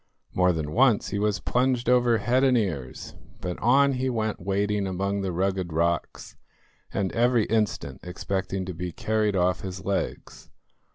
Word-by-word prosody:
More 90 0 +3
than 80 -3 -3
once 120 0 +3
he 100 - -2
was 105 0 0
plunged 125 -1 0
over 120 -2 +4
head 125 +4 +1
and 130 -2 +4
ears, 80 - -3 0.3
but 90 -1 -4
on 135 +4 +4
he 130 0 -1
went 110 -3 -2
wading 100 +2 0
among 100 +2 -2
the 95 -1 -2
rugged 95 0 -1
rocks, 85 +1 -2 0.6
and 95 -2 -1
every 120 -2 +2
instant 110 -2 -1
expecting 95 +1 -3
to 90 - -5
be 90 +1 -5
carried 105 +3 0
off 90 -2 +1
his 95 0 -7
legs. 100 0 -4
100 Hz, 160 wpm, -26 LUFS, 90-120 Hz, 0.6 s, over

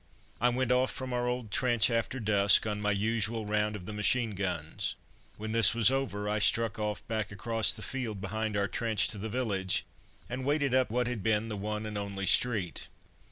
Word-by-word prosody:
I 120 - +3
went 125 0 0
off 125 +1 +3
from 130 -1 -5
our 120 0 -1
old 125 -3 -3
trench 120 0 +3
after 115 +3 -1
dusk 100 -2 +5
on 105 -1 -3
my 105 - 0
usual 110 +2 0
round 105 0 0
of 90 -4 -8
the 105 - -6
machine 110 +2 +1
guns. 90 -1 -3 0.4
When 110 +1 -5
this 115 -1 +5
was 115 +1 +5
over 130 -7 -2
I 105 +1 0
struck 115 +2 +2
off 105 -1 -3
back 110 -3 -2
across 110 +2 +2
the - - -5
field 120 -6 -4
behind 105 +2 -3
our 100 0 +1
trench 115 0 +1
to 105 - -3
the 110 +3 -4
village, 100 -6 -1 0.4
and 130 +2 -5
waded 140 -1 +1
up 130 -1 +3
what 125 +3 0
had 120 -3 -3
been 110 +1 0
the 105 - -3
one 105 +2 -4
and 105 -1 -4
only 100 -1 -4
street. 105 -6 +1
110 Hz, 205 wpm, -30 LUFS, 105-120 Hz, 0.4 s, dusk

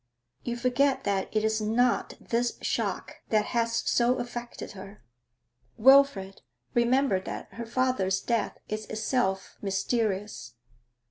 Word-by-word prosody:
'You 240 0 -3
forget 265 +2 +2
that 195 -1 -1
it 215 0 0
is 220 0 +1
not 235 +3 +1
this 240 +1 -1
shock - - -2
that 215 -1 +2
has 230 -1 +1
so 240 +1 +3
affected 240 -1 -6
her.' 195 +1 -11 0.7
'Wilfrid, 250 -6 +5 0.3
remember 240 -3 +3
that 185 - -7
her 235 -1 -6
father's 235 -6 +1
death 230 +1 -1
is 215 0 -4
itself 215 -3 -1
mysterious. 200 - -2
230 Hz, 120 wpm, -28 LUFS, 200-245 Hz, 0.7 s, Wilfrid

